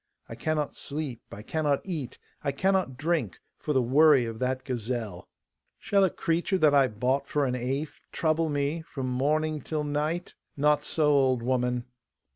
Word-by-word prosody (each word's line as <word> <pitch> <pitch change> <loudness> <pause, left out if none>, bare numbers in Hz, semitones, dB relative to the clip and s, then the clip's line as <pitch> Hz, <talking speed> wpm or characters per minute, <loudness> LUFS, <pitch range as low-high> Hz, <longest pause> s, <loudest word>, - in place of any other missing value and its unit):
I - - -8
cannot 150 +5 -1
sleep, 140 -5 -5
I 105 - -8
cannot 150 +1 0
eat, 160 -10 -5 0.3
I 140 - +1
cannot 185 -3 +1
drink, 150 - -1 0.2
for - - -3
the 130 -3 +3
worry 140 +1 +5
of 115 -1 -6
that 130 0 -1
gazelle. 115 -6 -4 0.5
Shall 200 -1 +2
a 190 - +4
creature 170 +4 0
that 155 -5 +4
I 140 -2 +5
bought 130 +5 -1
for 145 -1 +1
an 125 - -1
eighth 135 +4 -3
trouble 160 0 +1
me 145 +3 -1
from 135 -5 -5
morning 150 +4 0
till 155 +3 -2
night? 150 +4 -2 0.2
Not 150 +1 +3
so, 155 +1 0
old 130 -4 +3
woman! 125 -1 0
140 Hz, 165 wpm, -28 LUFS, 125-155 Hz, 0.5 s, worry